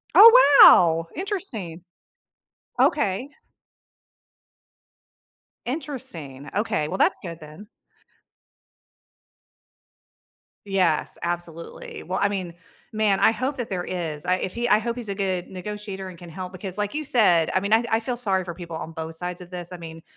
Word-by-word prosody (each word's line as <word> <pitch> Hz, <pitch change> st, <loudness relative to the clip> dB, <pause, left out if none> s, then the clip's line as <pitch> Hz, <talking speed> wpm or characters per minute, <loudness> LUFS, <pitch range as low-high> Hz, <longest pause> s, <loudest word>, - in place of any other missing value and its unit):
Oh, 450 Hz, -, +9 dB
wow! 165 Hz, -1 st, +6 dB
Interesting. 275 Hz, -, -4 dB, 1.0 s
Okay. 250 Hz, -1 st, +1 dB, 2.4 s
Interesting. 180 Hz, -, -6 dB
Okay. 200 Hz, -8 st, 0 dB
Well, 190 Hz, -, -4 dB
that's -, -, +3 dB
good 170 Hz, -2 st, -8 dB
then. 155 Hz, +7 st, -12 dB, 3.0 s
Yes. 185 Hz, -5 st, +1 dB
Absolutely. 170 Hz, -1 st, -6 dB
Well, 185 Hz, +2 st, -3 dB
I 200 Hz, -, +4 dB
mean, 185 Hz, -4 st, -4 dB, 0.4 s
man, 215 Hz, -3 st, +1 dB
I -, -, +6 dB
hope 255 Hz, +5 st, -2 dB
that 245 Hz, -, -4 dB
there 180 Hz, -2 st, -3 dB
is. 165 Hz, -4 st, -4 dB
I 180 Hz, 0 st, +2 dB
if 185 Hz, -, -4 dB
he 240 Hz, +1 st, -2 dB
I 210 Hz, -, +4 dB
hope 235 Hz, +2 st, -4 dB
he's 235 Hz, -3 st, -5 dB
a 200 Hz, -, -3 dB
good 190 Hz, -3 st, -2 dB
negotiator 195 Hz, 0 st, -7 dB
and 175 Hz, -, -12 dB
can 175 Hz, -1 st, -11 dB
help 180 Hz, +2 st, -7 dB
because 185 Hz, +1 st, -6 dB
like 210 Hz, +3 st, -2 dB
you 305 Hz, 0 st, -3 dB
said, 180 Hz, -11 st, +3 dB
I 185 Hz, -, +3 dB
mean, 200 Hz, +1 st, -3 dB
I 230 Hz, +2 st, +4 dB
I 225 Hz, -, +2 dB
feel 240 Hz, +1 st, -3 dB
sorry 195 Hz, -6 st, +1 dB
for 170 Hz, -1 st, -6 dB
people 170 Hz, -1 st, -8 dB
on 160 Hz, 0 st, -6 dB
both 160 Hz, 0 st, -6 dB
sides 180 Hz, +1 st, -4 dB
of 180 Hz, -1 st, -11 dB
this. 175 Hz, -1 st, -6 dB
I 180 Hz, -, -7 dB
mean, 165 Hz, -1 st, -10 dB
185 Hz, 155 wpm, -24 LUFS, 170-220 Hz, 3.0 s, Oh